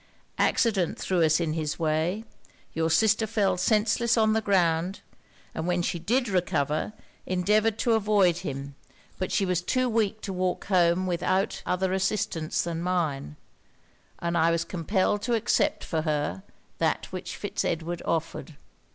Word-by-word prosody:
Accident 200 -8 +2
threw 185 -2 0
us 160 0 +3
in 165 -3 -1
his 155 -2 -2
way; 165 +6 0 0.5
your 160 0 0
sister 220 +4 +3
fell 200 -4 +1
senseless 215 +5 +2
on 220 -1 +4
the 220 - +1
ground; 180 -2 +1 0.5
and 160 - -4
when 175 -1 +1
she 170 - -2
did 245 +9 +1
recover, 170 -2 0 0.3
endeavoured 210 +4 +2
to 235 - +2
avoid 205 -5 +3
him: 140 -1 -5 0.5
but 185 - -2
she 195 - +2
was 180 -2 0
too 255 +7 0
weak 220 -2 0
to 195 - -4
walk 180 0 -1
home 180 -1 +3
without 185 +2 0
other 185 +1 0
assistance 190 -4 -1
than 170 -1 -3
mine, 160 - -1 0.8
and 170 0 -2
I 165 +1 +4
was 165 0 0
compelled 190 +3 0
to 235 +2 0
accept 225 - +1
for 160 -2 -1
her, 150 - -1 0.4
that - - +1
which - - -6
Fitz - - -3
Edward 170 +1 -2
offered. 165 -1 -3
180 Hz, 150 wpm, -27 LUFS, 165-210 Hz, 0.8 s, on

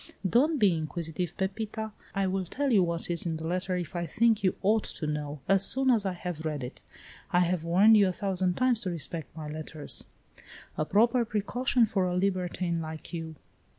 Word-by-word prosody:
"Don't 290 - +3
be 205 -8 +4
inquisitive, 165 +2 -3
Pepita. 220 +3 -3 0.2
I 195 0 +1
will 190 0 -1
tell 275 +10 -1
you 210 -5 +5
what 170 -1 -1
is 170 0 -3
in 160 -1 -1
the 160 - -6
letter, 185 +2 -1
if 180 0 -4
I 170 -1 -2
think 225 +5 +2
you 185 - +2
ought 215 +2 +3
to 155 - -3
know, 150 -1 -3
as 195 -1 +4
soon 265 0 +3
as 215 -5 +2
I 190 - -1
have 175 -3 -5
read 150 -4 -3
it. 125 - -8 0.5
I 175 - +3
have 175 -1 +1
warned 190 +7 +6
you 205 -2 +6
a - - +1
thousand 185 -1 -1
times 255 -3 +2
to 190 - -3
respect 165 -3 -4
my 155 -1 -5
letters." 155 0 -5 0.7
"A 155 - -1
proper 235 +7 +3
precaution 235 +3 +1
for 195 -3 0
a 180 0 -1
libertine 180 -2 0
like 160 +1 -7
you! 165 -1 -5
180 Hz, 200 wpm, -29 LUFS, 165-210 Hz, 0.7 s, warned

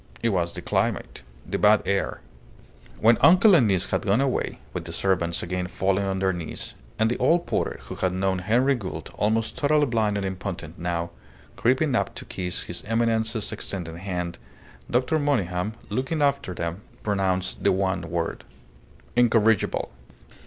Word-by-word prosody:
It 115 - +3
was 85 -4 0
the - - -7
climate - - -1 0.3
the - - -2
bad 105 0 +5
air. 100 0 -1 0.8
When 115 +1 +5
uncle 185 +5 +7
and 135 -10 +6
niece 95 -3 +2
had - - -1
gone 105 +3 +2
away, 135 -2 0 0.2
with - - -4
the - - -6
servants 90 -3 0
again 90 +1 -2
falling 95 +2 0
on 95 0 -1
their 95 0 +1
knees, 85 -3 -6 0.2
and 110 - +3
the 120 - -1
old 165 +7 +3
porter, - - -1
who - - -7
had 95 - 0
known 95 0 0
Henry 120 +9 +3
Gould, 105 -8 -5
almost 110 +2 0
totally 150 0 +3
blind 110 -5 +1
and 100 - -2
impotent 95 -3 -5
now, 85 0 -2 0.4
creeping 130 +4 +2
up - - 0
to - - -8
kiss 90 -1 -3
his 85 0 -6
Eminence's 115 0 0
extended 85 -4 -5
hand, 90 -2 -4 0.5
Dr. 125 +6 +2
Monygham, 105 - 0 0.2
looking 135 +5 -1
after 140 -10 0
them, 85 +3 -4 0.2
pronounced 95 -3 -1
the - - +4
one 95 -1 0
word 85 -1 -3 0.7
"Incorrigible!" 115 -3 +3
100 Hz, 160 wpm, -25 LUFS, 90-120 Hz, 0.8 s, uncle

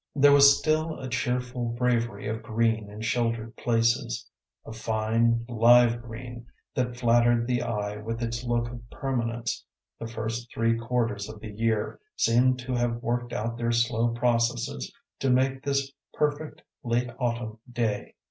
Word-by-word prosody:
There 145 0 +6
was 140 0 +8
still 155 +1 0
a 130 - -5
cheerful 125 -1 -1
bravery 120 -3 0
of 110 +1 -3
green 110 -1 0
in 105 +1 -9
sheltered 115 0 -1
places, 115 +1 0 0.4
a 110 - -8
fine, 115 +1 +1
live 120 0 +5
green 120 0 -9 0.3
that 125 -1 -1
flattered 120 -1 +3
the 125 0 0
eye 105 -2 -2
with 115 +2 -4
its 115 +1 -3
look 120 -1 0
of 120 -1 -8
permanence; 120 -3 -2 0.4
the 115 - -5
first 115 +1 -4
three 115 0 +1
quarters 115 -3 -1
of 110 -1 -9
the 110 0 -8
year 110 0 -1 0.2
seemed 125 +2 +3
to 125 +1 -4
have 120 -1 +1
worked 120 0 -1
out 115 0 -3
their 120 0 0
slow 120 0 +2
processes 115 - 0 0.3
to 135 - 0
make 130 +1 +2
this 140 0 -1 0.2
perfect 150 +1 -1 0.2
late 120 +1 0
autumn 115 -3 -2
day. 115 -4 -2
120 Hz, 150 wpm, -27 LUFS, 115-125 Hz, 0.4 s, was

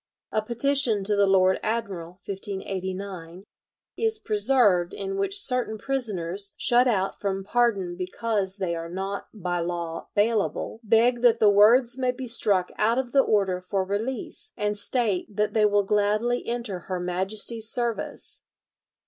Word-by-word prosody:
A 215 - +1
petition 235 -1 +2
to 205 +1 +1
the 200 0 +3
Lord 190 -1 +3
Admiral 200 -7 -3
(1589) 190 -2 -6 0.5
is 445 -1 +3
preserved 210 - +2
in 390 0 -4
which 395 0 -1
certain 250 - 0
prisoners, 200 -7 -2
shut 245 +1 +4
out 195 -5 0
from 195 -1 -2
pardon 200 -5 0
because 190 +1 -2
they 185 -4 -2
are 165 0 -6
not 195 +3 -5
"by 180 -4 -3
law 170 -1 -4
bailable," 220 +1 0
beg 235 +2 +3
that 235 -2 +4
the 210 -1 +5
words 235 +5 +5
may 255 -1 +1
be 255 +1 -3
struck 205 -6 +1
out 225 +3 +2
of 255 -2 -2
the 275 - +5
order 195 -6 +1
for 190 +1 -1
release, 210 +6 -4
and 210 0 -1
state 205 -2 -2
that 210 0 0
they 215 -1 +3
will 205 0 +2
gladly 210 +4 0
enter 235 -6 -3
her 185 +1 -5
Majesty's 200 +5 -1
service. 235 -2 -1
210 Hz, 150 wpm, -25 LUFS, 190-235 Hz, 0.5 s, the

